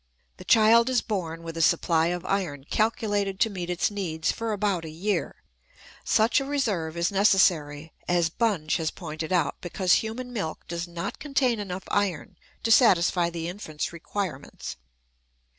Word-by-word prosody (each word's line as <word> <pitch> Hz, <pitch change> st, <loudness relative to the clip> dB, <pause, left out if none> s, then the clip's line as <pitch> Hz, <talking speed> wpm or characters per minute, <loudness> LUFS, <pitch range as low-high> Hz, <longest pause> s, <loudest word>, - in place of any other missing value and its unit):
The -, -, -12 dB
child 230 Hz, +2 st, +5 dB
is 255 Hz, -2 st, +1 dB
born 165 Hz, -6 st, -4 dB
with 165 Hz, 0 st, -7 dB
a -, -, 0 dB
supply 160 Hz, +1 st, +3 dB
of 175 Hz, +1 st, -3 dB
iron 175 Hz, -9 st, -2 dB
calculated 205 Hz, +1 st, 0 dB
to 225 Hz, -, +3 dB
meet 180 Hz, -3 st, -5 dB
its 180 Hz, +3 st, 0 dB
needs 165 Hz, -6 st, -1 dB
for 230 Hz, -1 st, -3 dB
about 200 Hz, -4 st, 0 dB
a 160 Hz, -, -6 dB
year. 175 Hz, +2 st, -3 dB, 0.6 s
Such 220 Hz, +5 st, +3 dB
a -, -, -3 dB
reserve 205 Hz, -, -1 dB
is 170 Hz, +2 st, +1 dB
necessary, 165 Hz, -7 st, +2 dB
as 175 Hz, -1 st, +2 dB
Bunge 180 Hz, -8 st, 0 dB
has 160 Hz, -2 st, -1 dB
pointed 160 Hz, -1 st, -6 dB
out, 180 Hz, -2 st, +1 dB
because 180 Hz, +1 st, +1 dB
human 245 Hz, +3 st, -6 dB
milk 190 Hz, -9 st, -4 dB
does 170 Hz, 0 st, -4 dB
not 170 Hz, 0 st, -5 dB
contain 270 Hz, -5 st, 0 dB
enough 190 Hz, -2 st, -5 dB
iron 195 Hz, -7 st, -1 dB, 0.3 s
to 225 Hz, -, +1 dB
satisfy 180 Hz, -7 st, +4 dB
the 165 Hz, -1 st, -5 dB
infant's 170 Hz, -4 st, -5 dB
requirements. 170 Hz, -, -5 dB
180 Hz, 160 wpm, -26 LUFS, 165-210 Hz, 0.6 s, child